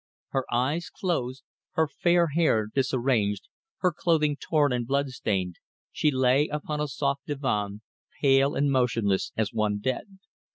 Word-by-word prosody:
Her 135 -1 -2
eyes 140 +8 0
closed, 135 - -2 0.3
her 160 -3 +2
fair 170 +3 +2
hair 145 -8 +2
disarranged, 125 - 0 0.3
her 180 - +3
clothing 155 -4 +2
torn 145 -2 +1
and 120 -1 -2
blood 140 +1 +1
stained, 95 -8 -2 0.3
she 155 - +2
lay 130 +2 +3
upon 150 0 -3
a 150 - 0
soft 140 0 -2
divan, 105 -8 -2 0.4
pale 135 0 +4
and 140 0 +2
motionless 115 -7 +1
as 110 0 0
one 105 -2 +1
dead. 130 - -3
135 Hz, 140 wpm, -27 LUFS, 115-150 Hz, 0.4 s, pale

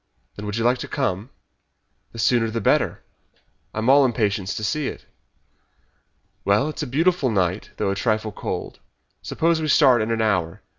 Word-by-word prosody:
"When 105 0 -7
would 105 +1 -3
you 115 - -1
like 120 +1 +2
to - - -5
come?" 115 -5 -2 0.8
"The - - -12
sooner 115 0 +2
the 115 +1 -2
better. - - +1 0.7
I - - -11
am 110 +2 -1
all 140 +2 +6
impatience 105 -5 0
to 110 - -5
see 150 +5 -1
it." - - -7 1.4
"Well, 105 +9 +2
it 155 - -8
is - - -3
a 150 - -3
beautiful 160 +2 +1
night 95 -2 -1
though 100 -2 0
a - - -2
trifle 110 0 -1
cold. - - -5 0.4
Suppose 165 0 0
we 155 - -1
start 130 -6 +5
in 110 - -2
an 115 0 0
hour. 95 -7 0
115 Hz, 185 wpm, -23 LUFS, 105-135 Hz, 1.4 s, all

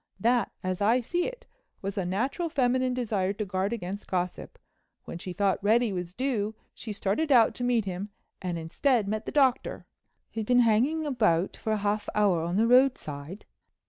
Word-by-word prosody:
That, 235 +4 +2
as 185 +1 -2
I 225 +5 +4
see 345 +9 -1
it, - - -8 0.4
was 195 0 -3
a 195 - -1
natural 255 - -1
feminine 255 -3 +1
desire 210 -6 0
to 210 +1 -4
guard 190 +2 -1
against 200 -3 -5
gossip. 180 -1 -3 0.5
When 170 - -7
she 180 - -6
thought 195 +1 0
Reddy 225 +1 +3
was 180 0 -5
due 225 -5 -1 0.2
she 225 - -7
started 210 +10 -1
out 240 -4 +6
to 245 - -5
meet 240 -3 +2
him—and 185 -1 -6
instead 205 - +1
met 215 +2 -3
the - - -2
Doctor." 270 -4 +1 0.5
"Who'd 220 -2 -3
been 245 0 +5
hanging 250 +8 +2
about 215 - +1
for 220 - -4
a 215 - +2
half 205 +1 -1
hour 200 -5 +3
on 170 +2 -2
the 220 - +4
roadside?" 210 - +1
215 Hz, 175 wpm, -28 LUFS, 190-245 Hz, 0.5 s, out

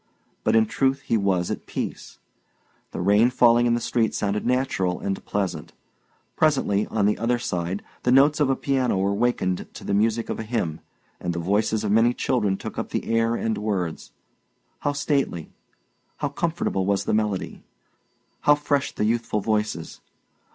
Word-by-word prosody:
But - - +2
in 110 0 +5
truth 135 +5 0
he 125 - 0
was 95 -4 +1
at - - -5
peace. - - -5 0.7
The - - -6
rain 105 +6 +4
falling 120 -1 +4
in 120 - +3
the - - 0
street 115 -1 0
sounded 105 +2 -1
natural 125 -8 0
and 95 -1 -3
pleasant. 100 -3 -3 0.6
Presently, 135 -9 +2
on 105 -3 0
the 105 - +1
other 120 +1 +1
side, 90 -4 -3 0.2
the 125 - +1
notes 140 +4 +5
of 145 -3 +3
a 135 - +3
piano 130 -7 0
were 100 +1 +1
wakened 100 -5 0
to - - -9
the - - -2
music 110 +3 +1
of - - -3
a - - -3
hymn, 105 -9 -2 0.4
and 90 - -2
the - - -2
voices 105 +4 +1
of 105 - 0
many 115 +3 +4
children 105 -6 0
took - - -6
up - - -4
the - - -3
air 115 0 +2
and 110 -2 -1
words. 95 -6 -3 0.7
How 145 - -1
stately, 140 - -1 0.7
how 145 - -2
comfortable 145 - -1
was 100 -1 +1
the - - 0
melody! 105 -3 -1 0.8
How 145 - +5
fresh 145 -1 0
the 105 - -1
youthful 115 -1 0
voices! 105 -6 -2
110 Hz, 170 wpm, -24 LUFS, 100-125 Hz, 0.8 s, in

